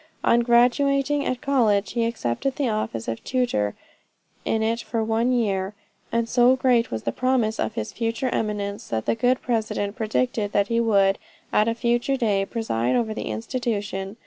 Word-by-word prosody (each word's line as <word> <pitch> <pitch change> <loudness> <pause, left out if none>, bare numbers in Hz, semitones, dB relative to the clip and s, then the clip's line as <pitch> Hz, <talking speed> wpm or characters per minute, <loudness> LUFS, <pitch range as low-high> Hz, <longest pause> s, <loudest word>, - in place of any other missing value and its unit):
On 235 - +4
graduating 275 +4 +3
at 255 -1 -2
college, 230 -8 +2
he 230 -1 0
accepted 230 - -2
the 280 - 0
office 215 - -2
of 115 0 -4
tutor 240 - 0 0.7
in 220 0 0
it 230 +1 0
for 230 -2 -2
one 225 +3 +1
year, 205 -5 0 0.4
and 230 0 0
so 245 +2 +4
great 250 -3 +2
was 110 -1 -4
the 115 - -1
promise 245 - 0
of 220 - -2
his - - -3
future 230 +2 -1
eminence, 205 -3 -3
that 110 -1 -2
the - - +2
good 245 +3 +1
president 220 -3 -1
predicted 220 -1 -1
that 200 0 +2
he 230 0 +1
would, 200 -4 +3 0.3
at 210 - +3
a 230 - 0
future 240 +3 0
day, 205 -5 +1
preside 125 - -1
over 220 -2 0
the 215 - -5
institution. 200 - -3
230 Hz, 170 wpm, -24 LUFS, 205-245 Hz, 0.7 s, On